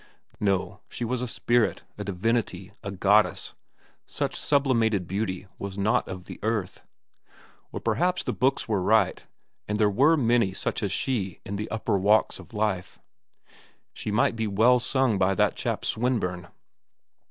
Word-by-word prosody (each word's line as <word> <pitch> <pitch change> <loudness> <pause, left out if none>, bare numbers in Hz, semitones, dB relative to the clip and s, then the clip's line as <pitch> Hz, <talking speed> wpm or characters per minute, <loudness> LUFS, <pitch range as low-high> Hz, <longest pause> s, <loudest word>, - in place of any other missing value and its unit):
No, 100 -3 0
she 120 - -4
was 125 +1 -2
a 125 - -2
spirit, 120 0 +1
a 105 - -5
divinity, 100 -1 -1
a 100 - -5
goddess; 100 +2 +2 0.5
such - - -3
sublimated 115 -9 +2
beauty 95 0 -3
was 100 -1 -6
not 100 +2 +1
of 90 -1 -7
the - - -9
earth. 105 -4 -2 0.9
Or - - -4
perhaps 175 +12 0
the - - -2
books 130 +1 +1
were 105 -4 0
right, 105 -1 +2 0.4
and 105 0 -2
there 105 -1 +4
were 145 +10 +4
many 115 -6 +2
such 95 - -3
as 100 -3 -1
she 100 -6 -2
in 100 - -4
the 105 +2 -4
upper 110 -3 0
walks 105 +3 +3
of - - -13
life. 105 -4 -2 1.0
She - - -6
might 110 +2 +1
well 115 +5 +4
be - - -7
sung 130 -7 +1
by 95 +1 +2
that - - +2
chap, - - -3
Swinburne. 100 -8 -1
105 Hz, 155 wpm, -26 LUFS, 95-120 Hz, 1.0 s, there